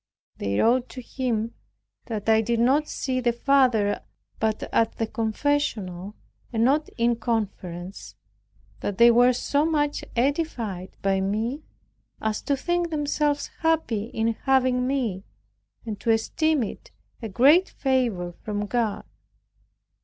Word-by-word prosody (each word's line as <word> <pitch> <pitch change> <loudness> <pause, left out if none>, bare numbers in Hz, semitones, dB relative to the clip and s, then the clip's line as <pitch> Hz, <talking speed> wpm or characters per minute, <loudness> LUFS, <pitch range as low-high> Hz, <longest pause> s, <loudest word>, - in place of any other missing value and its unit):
They 100 0 -1
wrote 245 +2 +3
to 255 - -8
him 235 -3 -2 0.5
that 215 -3 -5
"I 220 0 +5
did 230 +1 0
not 275 +6 +3
see 260 -1 -2
the 240 -1 +2
Father 240 -5 +2 0.4
but 220 -1 0
at 225 -1 +2
the 225 - -1
confessional, 220 -5 -2 0.4
and 225 -2 +1
not 285 +5 +2
in 235 0 +2
conference; 190 - -4 0.6
that 195 - -3
they 235 0 +8
were 245 +2 +6
so 285 +4 0
much 295 -2 0
edified 235 - -1
by 195 -1 +2
me, 220 +9 -1 0.6
as 220 -1 -2
to 280 - 0
think 345 +3 0
themselves 295 -1 0
happy 320 -10 +1
in 225 0 -1
having 255 0 +2
me, 235 -9 -1 0.6
and 215 -3 -5
to 230 - -3
esteem 285 +6 +2
it - - -7 0.3
a 225 - -4
greater 290 - +5
favor 240 -10 0
from 210 -1 -3
God." 225 -1 -1
235 Hz, 130 wpm, -25 LUFS, 215-275 Hz, 0.6 s, they